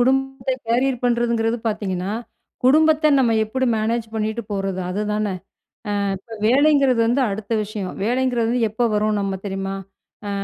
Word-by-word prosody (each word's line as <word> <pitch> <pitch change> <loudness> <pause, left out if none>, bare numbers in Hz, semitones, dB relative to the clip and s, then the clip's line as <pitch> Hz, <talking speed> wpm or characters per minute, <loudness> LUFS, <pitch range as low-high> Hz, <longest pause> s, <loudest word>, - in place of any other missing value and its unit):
குடும்பத்தை 270 +1 +1
கேரியர் 250 +2 +1
பண்ணுறதுங்கிறது 235 -1 +1
பார்த்தீங்கன்னா, 195 -3 -2 0.5
குடும்பத்த 310 +3 +5
நம்ம 250 -3 +3
எப்பிடி 260 +4 -1
மேனேஜ் 225 +1 -1
பண்ணிட்டு 220 +1 -2
போறது 195 -2 -2
அதுதான. 210 +2 -1 0.7
அ - - 0 0.3
இப்ப 225 +4 -11
வேலைங்கிறது 275 -1 +4
வந்து 245 +4 +2
அடுத்த 205 +2 -6
விஷயம். 205 -3 -5
வேலைங்கிறது 240 0 +1 0.2
எப்ப 235 +3 0
வரும் 210 0 +1
நம்ம 195 -1 -1
தெரியுமா? 195 0 -3 0.5
ஆ - - -3
230 Hz, 130 wpm, -21 LUFS, 210-255 Hz, 0.7 s, குடும்பத்த